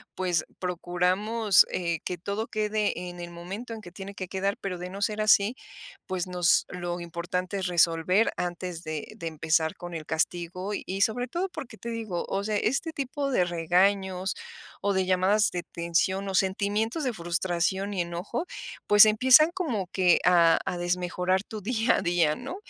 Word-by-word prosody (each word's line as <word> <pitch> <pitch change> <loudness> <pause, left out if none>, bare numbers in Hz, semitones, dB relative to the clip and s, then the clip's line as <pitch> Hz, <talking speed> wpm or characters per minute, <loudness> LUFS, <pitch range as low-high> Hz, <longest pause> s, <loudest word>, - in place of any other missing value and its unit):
pues 180 -3 0
procuramos, 185 +4 +2
eh, 170 -3 -1
que 180 - -3
todo 200 +6 -3
quede 210 -4 -1
en 175 0 -10
el 175 0 -6
momento 195 +8 -7
en 220 - -9
que 175 - -11
tiene 195 +2 -9
que 185 - -5
quedar, 195 +2 -1
pero, 180 -3 -4
de 180 +1 -5
no 200 +2 -8
ser 215 0 0
así, 215 +3 +4 0.5
pues, 185 -1 -2
nos 180 -2 +3
lo 175 -1 -4
importante 175 +3 -3
es 190 -1 -1
resolver 175 +4 +3
antes 175 -1 -4
de 155 -1 -5
de 165 - -6
empezar 160 0 0
con 175 0 -8
el 155 -2 -6
castigo 175 +4 -2
y, 195 0 -4
sobre 245 +4 +1
todo, 360 +8 -2
porque, 260 -9 -8
te 235 - -7
digo, 220 -7 -3
o 195 +1 -1
sea, 210 0 0
este 275 +10 -1
tipo 280 +1 -3
de 180 -8 +3
regaños 185 +2 +1 0.5
o 200 0 +1
de 190 0 +1
llamadas 190 +3 +3
de 175 - -3
tensión 175 +3 -1
o - - -3
sentimientos 205 - 0
de 250 -3 0
frustración 175 +2 -1
y 180 - 0
enojo, 175 - -4 0.4
pues, 210 +1 +9
empiezan 260 +9 +6
como 250 - -2
que 180 -2 +4
a 170 -2 +6
a 180 - -2
desmejorar 180 +2 0
tu 215 -1 -8
día 230 +2 +1
a - - -1
día, 170 -4 +2
¿no? 270 +8 -7
185 Hz, 175 wpm, -27 LUFS, 175-215 Hz, 0.5 s, pues